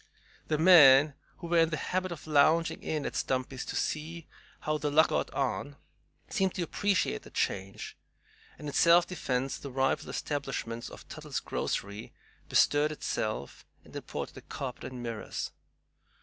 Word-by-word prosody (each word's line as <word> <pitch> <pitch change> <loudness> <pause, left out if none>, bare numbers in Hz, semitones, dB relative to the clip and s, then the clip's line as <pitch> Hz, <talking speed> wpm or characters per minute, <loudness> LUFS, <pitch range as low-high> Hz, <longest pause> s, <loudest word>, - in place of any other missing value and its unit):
The 155 - +1
men 150 -4 +8 0.2
who 175 - -9
were 170 0 +3
in 165 -1 +4
the 155 - -2
habit 185 +4 -2
of 155 -4 -7
lounging 155 +2 +3
in 155 -2 -2
at - - -4
Stumpy's 130 0 -2
to - - -5
see 160 +2 -3 0.4
"how 155 0 -1
'The 150 - -1
Luck' 155 +2 +5
got - - 0
on" 135 +2 -2 0.5
seemed 190 -1 0
to 180 - -1
appreciate 185 - 0
the - - -13
change, 95 0 -3 0.6
and 150 - -8
in 145 - -5
self 170 +1 +6
defense 135 -6 -2
the 140 - -7
rival 135 0 0
establishment 135 -5 -4
of - - -12
"Tuttle's - - -5
grocery" 100 +2 -4 0.4
bestirred 145 +1 +4
itself 110 -7 -3 0.2
and - - -15
imported - - -5
a - - -8
carpet 130 -3 -6
and 125 -1 -7
mirrors. 115 -2 -4
145 Hz, 155 wpm, -30 LUFS, 130-165 Hz, 0.6 s, men